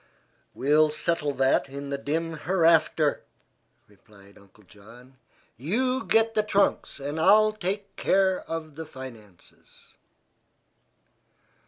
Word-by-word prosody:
"We'll 150 +3 +3
settle 155 -1 -1
that 135 +1 +1
in 140 +1 -7
the 140 - -1
dim 160 +3 -3
hereafter," 160 -3 +2 0.6
replied 100 -1 -21
Uncle 100 +1 -21
John. 115 +7 -17 0.4
"You 255 - -1
get 225 0 +2
the 215 - +2
trunks, 205 -6 0
and 145 +3 -5
I'll 215 +5 +5
take 200 0 -5
care 190 -1 +2
of 160 -2 -5
the 160 -1 -7
finances." 115 - -14
155 Hz, 110 wpm, -26 LUFS, 130-190 Hz, 0.6 s, I'll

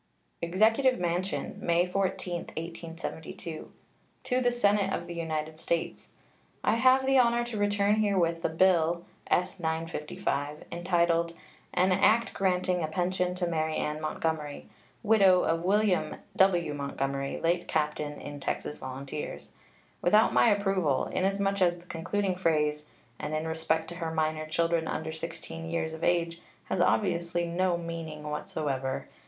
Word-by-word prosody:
EXECUTIVE 220 +9 +3
MANSION, 180 +3 -2
May 170 -2 +2
14, 185 -1 -1
1872. 165 0 -7 0.5
To 255 0 +1
the 245 -1 +3
Senate 205 -4 +2
of 170 - -2
the 175 - -6
United 160 -2 -3
States: 170 0 -2 0.5
I - - +3
have 260 +2 +5
the 270 0 +5
honor 240 -1 +3
to 240 -3 -4
return 205 0 +2
herewith 185 -6 +2
the - - 0
bill 170 0 +3 0.2
(S. 180 +2 +1
955) 160 -3 -3
entitled 170 -1 +1 0.4
"An 185 +1 +2
act 220 +5 +3
granting 180 -1 +1
a 155 - 0
pension 180 +2 0
to 180 -1 -1
Mary 160 -2 -1
Ann 150 +1 -2
Montgomery, 155 -1 -3 0.4
widow 195 -4 +5
of 165 0 +1
William 200 0 +2 0.2
W. 175 -5 +3
Montgomery, 140 -1 -3
late 175 +1 0
captain 150 -1 -1
in 145 0 -7
Texas 150 +2 -3
Volunteers," 135 +3 -6 0.5
without 210 +5 +4
my 235 - +5
approval, 195 -9 +1
inasmuch 195 +1 0
as 175 -1 +3
the 175 - -16
concluding 185 +3 -1
phrase, 150 -4 +1 0.3
"and 155 - -3
in 155 +1 -2
respect 160 0 0
to 175 - -7
her 165 -2 -3
minor 155 -1 -1
children 165 0 +1
under 160 0 -3
16 165 0 -6
years 160 -1 -2
of 160 - -8
age," 170 -1 +1 0.3
has - - +1
obviously 175 -3 +1
no 175 +1 +1
meaning 165 -3 -6
whatsoever. 145 -3 -3
170 Hz, 140 wpm, -29 LUFS, 160-190 Hz, 0.5 s, have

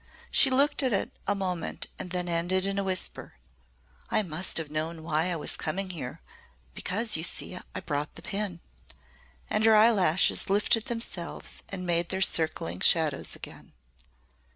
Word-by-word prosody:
She 275 - +5
looked 275 +4 +2
at 260 -4 +1
it 195 - -1 0.2
a 205 - +1
moment 185 -3 -2
and - - -3
then 180 0 -1
ended 175 +2 +1
in 195 0 -1
a - - -1
whisper. 185 -1 -3 0.7
"I 215 - +2
must 175 0 +1
have 160 -3 -1
known 160 +1 -4
why 160 0 0
I - - -1
was 155 - -2
coming 185 +4 -2
here 140 -8 -7 0.5
because, 215 - +1
you 160 - 0
see, 180 - -1 0.2
I - - -2
brought 145 -1 -3
the - - -12
pin." 200 -4 -3 0.9
And 215 - 0
her 220 0 +6
eyelashes 200 -8 +4
lifted 210 +2 +2
themselves 230 -7 -2
and 185 -2 -5
made 170 -1 +1
their 190 - -2
circling 160 - +1
shadows 155 -4 +4
again. - - -9
180 Hz, 160 wpm, -27 LUFS, 165-200 Hz, 0.9 s, her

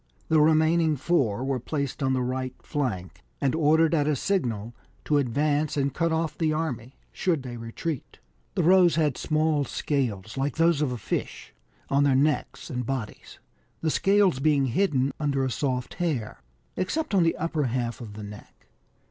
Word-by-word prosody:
The 160 -1 +5
remaining 160 +1 +4
four 130 -7 +1
were 135 -1 -1
placed 140 +2 -3
on 130 -1 +2
the 130 -1 0
right 130 0 -3
flank, 100 - -3 0.2
and 135 -2 +1
ordered 160 +1 +3
at 150 -3 +2
a 150 - +2
signal 120 - -1 0.3
to 145 -1 +3
advance 145 +4 0
and 140 -1 0
cut 165 +2 0
off 160 -1 -1
the 160 -1 0
army, 135 -6 -3 0.2
should 165 -7 0
they 125 -2 -6
retreat. 115 +6 -5 0.4
The - - +1
Rohs 180 0 +5
had 150 -5 +1
small 155 -1 +1
scales, 120 -7 -2
like 135 0 -1
those 165 -2 +3
of 145 -4 +1
a 125 - -3
fish, 110 - -4 0.4
on 140 +1 +3
their 140 -2 +3
necks 145 +3 0
and 125 -1 -2
bodies, 125 -3 -5 0.4
the 160 - +1
scales 195 -6 +3
being 145 -1 +3
hidden 140 -2 +1
under 140 -3 0
a 130 - -2
soft 125 -1 -2
hair, 130 - -3 0.3
except 305 - -2
on 195 - +4
the 165 -1 +2
upper 160 -3 -1
half 120 -1 -2
of 110 -3 -8
the 105 0 -8
neck. 105 0 -12
145 Hz, 175 wpm, -26 LUFS, 125-160 Hz, 0.4 s, The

